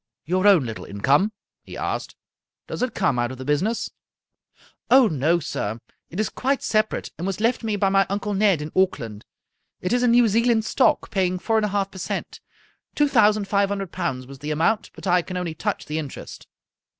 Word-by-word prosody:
" - - -64
Your 185 +5 +2
own 185 -10 +6
little 115 -2 -6
income," 140 - +2 0.3
he - - -10
asked, - - -3 0.3
" - - -65
does - - -5
it 250 -2 -1
come 155 -11 +1
out 120 +1 0
of 130 - -8
the 130 - -7
business? 180 - 0 0.3
" - - -45
" - - -30
Oh, 255 0 +7
no, 160 +1 +1
sir. 115 -7 -4 0.3
It 175 - -6
is 215 - +1
quite 270 +1 -1
separate, 215 0 0
and 175 - -2
was 195 0 -3
left 230 +2 +1
me 220 -2 -1
by 200 -1 +2
my 195 0 +3
Uncle 205 +1 -2
Ned 195 -6 +2
in 150 - -7
Auckland. 115 - 0 0.5
It 180 - -1
is 245 - +2
in 250 - +3
New 240 0 +5
Zealand 230 +1 +2
stock, - - +2
paying 185 -2 +1
four 225 +5 0
and 215 -1 +2
half 200 0 -1
per 190 - -10
cent. 185 - -4 0.6
Two 295 - +3
thousand 215 -6 +3
five 200 -1 +2
hun 200 - -1
dred 195 -3 -5
pounds 135 -8 -3
was 135 +1 -12
the 150 - -5
amount, 165 +9 +1
but - - -10
I 180 -1 +3
can 180 +2 -6
only 175 -3 -3
touch - - -3
the 155 +1 -3
interest." 145 -4 -8
195 Hz, 220 wpm, -23 LUFS, 155-215 Hz, 0.6 s, Oh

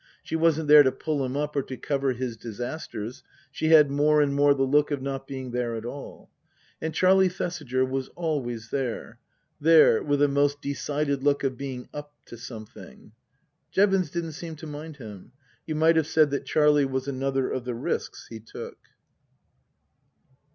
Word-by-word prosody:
She - - -4
wasn't 160 -1 +2
there 150 0 +9
to 130 -2 +3
pull 150 -1 -2
him 130 +1 -3
up 150 0 -2
or 140 - +2
to 130 -1 -8
cover 135 -2 -1
his 125 -1 -4
disasters; 120 0 -6 0.3
she 155 - -2
had 155 -3 +6
more 150 +2 +3
and 145 -1 +2
more 145 0 +4
the 135 - +1
look 145 +2 +3
of 145 -2 -1
not 135 0 -5
being 130 -2 -6
there 120 -1 -2
at 110 0 -6
all. 140 +3 -9 0.5
And 160 - -2
Charlie 190 +2 +4
Thesiger 150 -8 -2
was 130 0 -3
always 125 -9 -3
there. 130 -4 -3 0.4
There 155 -6 +6
with 145 -1 +1
a - - +5
most 145 +1 +1
decided 140 0 -2
look 140 0 +1
of 135 -2 0
being 130 -1 -6
up 145 0 -8
to - - -10
something. 115 -3 -11 0.6
Jevons 195 -4 +2
didn't 170 0 -4
seem 160 +1 -7
to 160 +1 -10
mind 150 0 -8
him. 110 -1 -11 0.3
You 155 - -2
might 160 +1 +4
have 160 -2 +2
said 155 -3 +3
that 140 - -2
Charlie 150 -1 +4
was 130 0 -3
another 135 -1 -1
of 130 - -3
the 125 -1 -3
risks 115 - -4
he 115 - -7
took. 110 - -10
140 Hz, 180 wpm, -26 LUFS, 130-150 Hz, 0.6 s, there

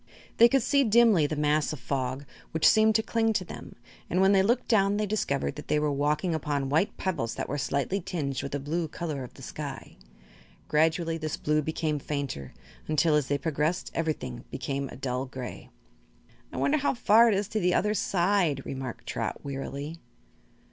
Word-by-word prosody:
They 235 +1 +8
could 270 -1 +2
see 280 +3 +3
dimly 220 - +5
the 155 - -3
mass 150 0 +1
of 155 - -6
fog, 130 +1 -3 0.3
which 160 - +4
seemed 220 0 +5
to 220 - +3
cling 225 -1 +1
to 185 - -1
them, - - -10 0.3
and 180 - +1
when 190 +1 +5
they 195 -1 +5
looked 230 +6 +1
down 200 -2 +3
they 210 - 0
discovered 195 -10 -1
that 150 - -8
they 150 - +2
were 150 0 +1
walking 150 +5 0
upon 145 -3 -1
white 160 +9 +1
pebbles 165 -12 -2
that - - -3
were 145 - -3
slightly 140 +9 -1
tinged 140 -7 -3
with 140 - -6
the 145 - -1
blue 160 +4 -2
color 150 -3 -4
of 125 - -11
the - - -12
sky. - - -7 0.7
Gradually 165 +2 +1
this 155 -1 -3
blue 150 0 +1
became 155 0 -2
fainter, 140 - -4 0.4
until, 155 +1 +2
as 150 -3 +2
they 145 - +1
progressed, 155 +3 -1
everything 150 -7 -3
became 140 -1 -3
a - - -9
dull 130 0 -2
gray. 130 -1 -8 0.8
"I - - -7
wonder 305 - +2
how 280 - +1
far 230 0 +5
it 220 - +3
is 200 0 -1
to 220 - -1
the 180 -2 +2
other 210 0 +2
side," 175 -7 +1
remarked 130 -3 -6
Trot, - - -4
wearily. 140 +3 -5
155 Hz, 190 wpm, -28 LUFS, 140-195 Hz, 0.8 s, They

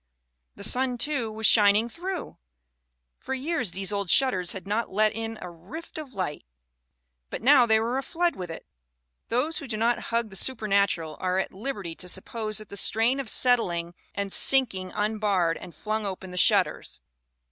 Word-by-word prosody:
The 200 - -9
sun, 250 +3 +2
too, 245 -3 -1
was 220 +1 -4
shining 210 +1 +5
through. 355 +7 -6 0.8
For 265 - -4
years 270 - -1
these 195 +3 -2
old 200 -2 -2
shutters 185 -10 +3
had 190 - -8
not 215 +3 -1
let 215 +2 +2
in 225 0 -5
a 180 - -7
rift 275 - -9
of 275 -6 -9
light; 180 -6 -3 0.9
but - - -6
now 255 -2 +6
they 220 -1 +4
were 235 +4 -1
aflood 345 +5 -1
with 180 -2 -6
it" 165 - -8 0.6
Those 285 +7 0
who 280 - -8
do 220 - -3
not 235 +2 +2
hug 230 -2 0
the - - -9
supernatural 200 -8 +1
are 185 0 0
at 190 - -2
liberty 200 -5 -5
to 180 - -4
suppose 215 +3 -2
that 215 - -6
the 200 - -7
strain 225 +7 +2
of 265 -5 -3
settling 180 -9 +2 0.2
and 200 -1 -3
sinking 215 -9 +1
unbarred 205 -5 0
and 170 - -11
flung 215 +4 -2
open 190 -1 -6
the - - -8
shutters. - - +2
215 Hz, 175 wpm, -26 LUFS, 190-250 Hz, 0.9 s, now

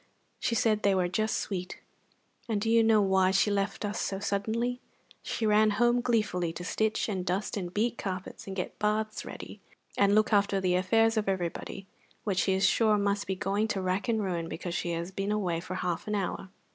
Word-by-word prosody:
She 230 - 0
said 215 -2 +2
they 200 -2 +3
were 180 -1 +2
just 215 +4 0
sweet. 185 -3 -4 0.7
And 215 -2 +1
do 225 +2 0
you 230 0 +6
know 220 -2 +4
why 190 -1 +3
she 195 +2 +3
left 200 +1 -1
us 205 +1 -2
so 195 - -2
suddenly? 220 +5 -1 0.4
She 225 - -3
ran 215 0 +5
home 240 +1 +3
gleefully 210 -8 0
to 175 - -7
stitch 220 +4 0
and 190 -4 -2
dust 185 +3 -2
and 180 -4 -4
beat 235 +5 0
carpets, 185 0 -5
and 190 - -5
get 180 - -4
baths 215 +1 -1
ready, - - -9 0.4
and 200 0 +4
look 215 +1 +3
after 200 -1 +3
the 185 -1 +1
affairs 225 +5 +3
of 210 -2 +1
everybody, 190 +1 -3 0.4
which 195 -3 0
she 190 - +2
is 190 +1 +2
sure 215 -2 +3
must 200 0 0
be 190 - -1
going 200 +3 0
to 200 -3 -2
rack 185 +4 -1
and 220 -3 +1
ruin 170 -3 -2
because 175 0 -5
she 175 - -2
has 170 +2 -4
been 195 +2 -2
away 185 -6 0
for 185 +2 -6
half 180 -1 -2
an 210 - -1
hour!" 190 -1 -3
200 Hz, 210 wpm, -29 LUFS, 185-215 Hz, 0.7 s, you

